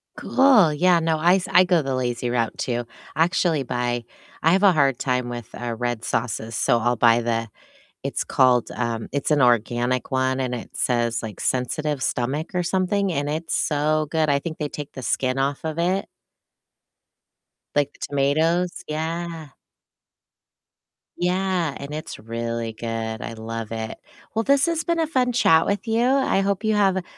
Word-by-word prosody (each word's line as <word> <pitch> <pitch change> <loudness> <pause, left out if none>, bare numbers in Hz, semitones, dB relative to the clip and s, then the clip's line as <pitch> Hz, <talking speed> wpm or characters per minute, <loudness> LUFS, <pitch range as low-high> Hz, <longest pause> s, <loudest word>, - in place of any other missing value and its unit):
Cool. 225 - +4
Yeah, 175 +3 +4
no, 160 -1 +1
I 175 +3 +5
s 190 - -2
I 180 - +7
go 180 -3 +3
the 135 -1 -2
lazy 120 -1 -2
route 115 -2 -1
too. 120 -1 -2 0.3
I 160 - +4
actually 170 -4 +1
buy 120 -1 -2 0.4
I 165 - +4
have 190 +2 +3
a 195 - +7
hard 140 -6 +2
time 125 -2 -1
with, 120 -2 -6
uh, 120 -1 -4
red 120 -2 -2
sauces, 115 -1 -2
so 120 - +2
I'll 120 +2 +1
buy 115 +1 +4
the 115 -1 -1 0.5
it's - - -2
called, 125 -2 +3
um 115 -2 -3
it's 140 +2 -1
an 145 -2 +4
organic 120 +1 +1
one 130 0 +1
and 125 -1 -1
it 115 - -7
says, 120 -2 0
like, 110 -2 -7
sensitive 135 +3 -1
stomach 145 +9 -2
or 180 - +1
something, 190 +2 0
and 145 -2 -1
it's 160 +2 -2
so 155 0 +1
good. 160 -2 +1
I 140 - +3
think 160 +1 -6
they 150 -1 -2
take 145 -1 -7
the 130 - -7
skin 130 +3 0
off 140 +2 -1
of 160 +1 -3
it 185 +3 0 1.7
like 145 -1 +1
the - - -23
tomatoes. 160 +6 +1 0.2
Yeah. 165 +1 -4 1.7
Yeah. 180 -3 0
And 140 +2 -7
it's 155 - -7
really 115 0 -4
good, 115 0 -4
I 115 - -5
love 115 0 -6
it. 110 0 -4 0.4
Well, 225 - +1
this 280 +4 +3
has 330 -1 0
been 335 -1 0
a 320 - +1
fun 255 -4 +1
chat 165 -9 +4
with 205 +3 -2
you, 225 +2 +2
I 265 -6 +2
hope 200 +1 -1
you 215 -1 +2
have 190 -3 +2
145 Hz, 175 wpm, -23 LUFS, 120-175 Hz, 1.7 s, I